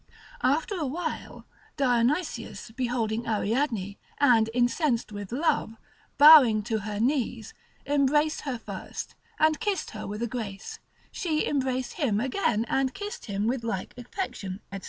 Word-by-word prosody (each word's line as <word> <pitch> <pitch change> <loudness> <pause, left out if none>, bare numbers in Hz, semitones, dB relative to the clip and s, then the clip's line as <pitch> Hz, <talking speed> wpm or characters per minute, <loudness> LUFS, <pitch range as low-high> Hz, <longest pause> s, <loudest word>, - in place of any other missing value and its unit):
After 290 +10 +1
a 305 - -1
while 320 +4 -5 0.3
Dionysius 245 - 0
beholding 235 -2 -2
Ariadne, 220 -2 -1 0.2
and 235 -6 +4
incensed 245 0 +1
with 205 -1 -7
love, 250 -4 0 0.4
bowing 275 -8 +8
to 220 0 -1
her 210 0 -5
knees, 235 -3 -1 0.3
embraced 290 +2 +2
her 270 -4 -3
first, 200 -4 -7 0.2
and 310 -3 +3
kissed 415 -4 -1
her 215 - -6
with 210 +3 -4
a - - 0
grace; 210 -5 -6 0.3
she 315 -4 -1
embraced 260 -3 -1
him 215 -8 +2
again, 240 - 0
and 270 -1 0
kissed 410 0 -6
him 200 0 -2
with 240 +1 -1
like 195 -5 -3
affection, 245 - -5
&c. 195 - -4
245 Hz, 135 wpm, -27 LUFS, 220-285 Hz, 0.4 s, bowing